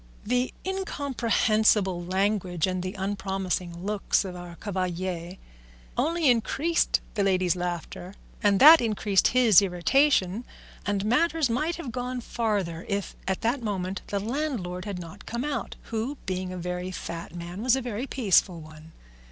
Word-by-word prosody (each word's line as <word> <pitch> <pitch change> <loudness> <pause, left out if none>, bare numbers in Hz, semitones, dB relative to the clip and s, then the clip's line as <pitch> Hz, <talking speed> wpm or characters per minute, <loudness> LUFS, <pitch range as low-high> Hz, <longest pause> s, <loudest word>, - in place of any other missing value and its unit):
The 250 +3 +1
incomprehensible 225 - +1
language 185 -2 0
and 185 -1 -2
the 185 +3 -5
unpromising 190 -3 -3
looks 210 -1 +1
of 185 -1 -6
our 175 -1 -9
cavalier 180 -1 -3 0.6
only 330 +2 +1
increased 275 +7 +2
the 205 - 0
ladies' 185 -2 +2
laughter, 175 +1 -5 0.3
and 200 -2 +3
that 315 +3 +10
increased 210 -3 +2
his 235 -6 +6
irritation, 200 +3 +2 0.4
and 200 0 0
matters 310 +3 +2
might 310 +8 0
have 285 -8 -6
gone 250 +1 -3
farther 205 -8 -2
if 200 -1 -2
at 190 0 -1
that 245 +4 0
moment 190 -3 -3
the 200 - -1
landlord 215 -7 -3
had 200 -3 -4
not 180 +3 -10
come 235 +2 -3
out, 295 -1 -3 0.2
who, 230 +6 -2
being 185 -1 -3
a 185 - -5
very 180 +1 -4
fat 170 -2 -6
man, 175 +3 -6
was 250 +1 +4
a - - 0
very 240 +1 -4
peaceful 195 -8 +2
one. 155 +1 -13
200 Hz, 145 wpm, -27 LUFS, 180-245 Hz, 0.6 s, that